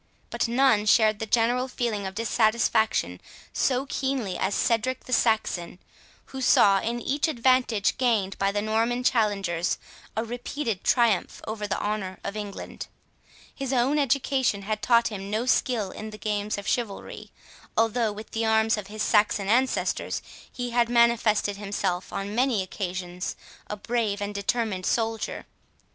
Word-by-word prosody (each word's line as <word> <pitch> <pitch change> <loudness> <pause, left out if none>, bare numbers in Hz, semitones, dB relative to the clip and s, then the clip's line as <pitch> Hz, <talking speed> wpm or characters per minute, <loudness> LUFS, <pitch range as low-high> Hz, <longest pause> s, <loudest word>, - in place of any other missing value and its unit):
But - - 0
none 235 -3 +3
shared 215 -1 +4
the 220 - -3
general 245 +3 +2
feeling 225 -6 -2
of 190 - -8
dissatisfaction 220 - +1 0.3
so 260 0 +1
keenly 265 -9 -2
as 190 +2 -1
Cedric 250 +2 0
the 255 - -5
Saxon, 215 -8 +1 0.6
who 265 - -5
saw, 200 -5 +5
in 235 +4 -2
each 280 +6 0
advantage 250 -6 +2
gained 220 -7 +1
by 195 0 +2
the 205 0 -1
Norman 230 +3 0
challengers, 195 -8 +1 0.4
a 220 - 0
repeated 240 -2 -4
triumph 235 -6 +2
over 215 -1 -3
the - - -1
honour 200 -3 -3
of 200 - -4
England. 205 -2 -6 0.7
His 270 -1 -4
own 265 +4 +2
education 265 -6 +1
had 215 +1 -3
taught 235 -1 +4
him 200 -2 -6
no 215 +3 -1
skill 235 -6 +1
in 215 - -7
the 215 - -9
games 210 -1 -2
of 200 0 -7
chivalry, 225 -5 -3 0.5
although, 225 0 +2
with 215 +1 -9
the 225 - -1
arms 220 0 +3
of 205 -2 -6
his 215 +1 -4
Saxon 205 -1 +2
ancestors, 255 +4 +1 0.3
he 245 -1 -4
had 235 0 +2
manifested 235 -4 +3
himself, 200 -3 -2
on 200 +1 -4
many 240 -4 +2
occasions, 180 -1 -4 0.3
a 210 - -5
brave 220 -2 -1
and 205 0 -3
determined 200 -2 -1
soldier. 225 -1 -1
220 Hz, 150 wpm, -26 LUFS, 205-240 Hz, 0.7 s, saw